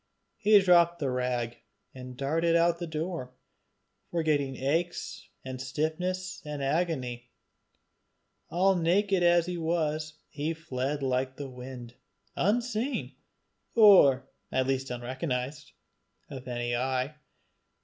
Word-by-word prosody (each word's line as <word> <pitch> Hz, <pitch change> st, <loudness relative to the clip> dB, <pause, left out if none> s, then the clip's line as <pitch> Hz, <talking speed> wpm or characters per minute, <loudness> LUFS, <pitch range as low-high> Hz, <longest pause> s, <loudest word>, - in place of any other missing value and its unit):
He 215 Hz, -1 st, +6 dB
dropped 175 Hz, -2 st, +5 dB
the 140 Hz, -5 st, -1 dB
rag, 125 Hz, -2 st, -2 dB, 0.4 s
and 125 Hz, -1 st, -9 dB
darted 165 Hz, +5 st, +1 dB
out 170 Hz, +1 st, +5 dB
of 170 Hz, -, -13 dB
the 175 Hz, -, -4 dB
door, 160 Hz, -4 st, -4 dB, 0.8 s
forgetting 150 Hz, -5 st, 0 dB
aches 165 Hz, +7 st, -2 dB, 0.2 s
and 130 Hz, -1 st, -5 dB
stiffness 180 Hz, +7 st, -2 dB
and 150 Hz, -2 st, -5 dB
agony. 135 Hz, -6 st, -1 dB, 1.2 s
All 190 Hz, +2 st, +3 dB
naked 185 Hz, +3 st, +2 dB
as 175 Hz, -1 st, +4 dB
he 180 Hz, 0 st, -4 dB
was, 155 Hz, -2 st, -1 dB
he 155 Hz, +3 st, -3 dB
fled 140 Hz, -2 st, -3 dB
like 130 Hz, 0 st, 0 dB
the 140 Hz, -2 st, -7 dB
wind, 125 Hz, -1 st, -9 dB, 0.4 s
unseen, 235 Hz, +5 st, 0 dB, 0.6 s
or 160 Hz, -, +7 dB, 0.2 s
at 130 Hz, 0 st, +1 dB
least 135 Hz, 0 st, -1 dB
unrecognized, 130 Hz, +3 st, -4 dB, 0.6 s
of 130 Hz, -2 st, -8 dB
any 120 Hz, -1 st, -2 dB
eye. 130 Hz, +3 st, -1 dB
150 Hz, 115 wpm, -29 LUFS, 130-175 Hz, 1.2 s, or